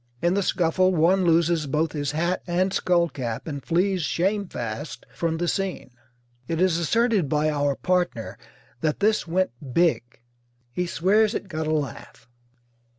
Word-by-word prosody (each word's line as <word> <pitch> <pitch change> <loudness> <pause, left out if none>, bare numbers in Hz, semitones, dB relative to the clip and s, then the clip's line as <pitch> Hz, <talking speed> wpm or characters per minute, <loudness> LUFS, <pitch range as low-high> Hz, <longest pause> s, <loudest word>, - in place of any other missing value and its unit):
In 175 +5 +1
the 200 - +1
scuffle 185 +1 +2
one 180 +4 +3
loses 165 -2 +2
both 155 +3 0
his 145 -1 -3
hat 170 +4 0
and 185 +2 +1
skull 175 -1 +2
cap 120 -6 -5
and 140 -3 -5
flees 185 +2 +1
shamefast 150 - -2
from 165 +3 -1
the 175 +1 -1
scene. 190 -8 -2 0.6
It 165 - -2
is 180 -2 +2
asserted 210 - +1
by 150 +1 +1
our 145 -1 0
partner 175 -11 -1 0.4
that 155 +1 -1
"this 210 -2 +2
went 185 0 +1 0.2
big." 170 -1 +3 0.7
He 180 +7 -2
swears 210 +6 +2
it - - -4
got 160 -3 -3
a - - 0
laugh. 140 -6 -4
170 Hz, 155 wpm, -24 LUFS, 150-185 Hz, 0.7 s, one